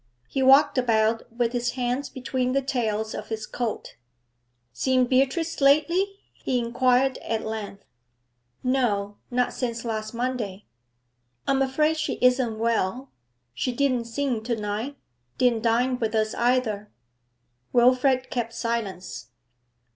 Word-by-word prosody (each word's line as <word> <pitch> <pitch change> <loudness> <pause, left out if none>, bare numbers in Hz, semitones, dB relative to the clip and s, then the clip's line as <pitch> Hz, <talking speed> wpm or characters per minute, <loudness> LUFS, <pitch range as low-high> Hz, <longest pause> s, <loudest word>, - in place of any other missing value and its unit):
He 270 - -2
walked 270 +1 +6
about 225 -1 +1
with 235 0 -1
his 245 0 -1
hands 250 +2 -2
between 255 0 -2
the 275 - +2
tails 220 -4 -1
of - - -6
his 220 -1 -4
coat. 230 - -4 0.8
'Seen 255 - +2
Beatrice 275 +6 +1
lately?' 340 +8 +3 0.2
he 255 - -2
inquired 250 +2 +2
at 225 -1 -3
length. 215 -2 -6 0.8
'No; 210 -6 0
not 250 0 0
since 235 -2 -3
last 220 0 -3
Monday.' 230 -5 -3 0.8
'I'm 270 0 +2
afraid 305 +4 +2
she 310 - -1
isn't 250 -3 +3
well. 230 +3 -1 0.4
She 190 - -1
didn't 255 -2 +1
sing 245 -1 -2
to 240 0 0
night. 215 +6 -4 0.4
Didn't 240 -3 +2
dine 245 +3 +1
with 225 -1 -1
us 215 0 +1
either.' 235 -4 0 0.8
Wilfrid 255 +1 +3
kept 230 -2 -2
silence. 210 - -4
245 Hz, 125 wpm, -25 LUFS, 220-260 Hz, 0.8 s, walked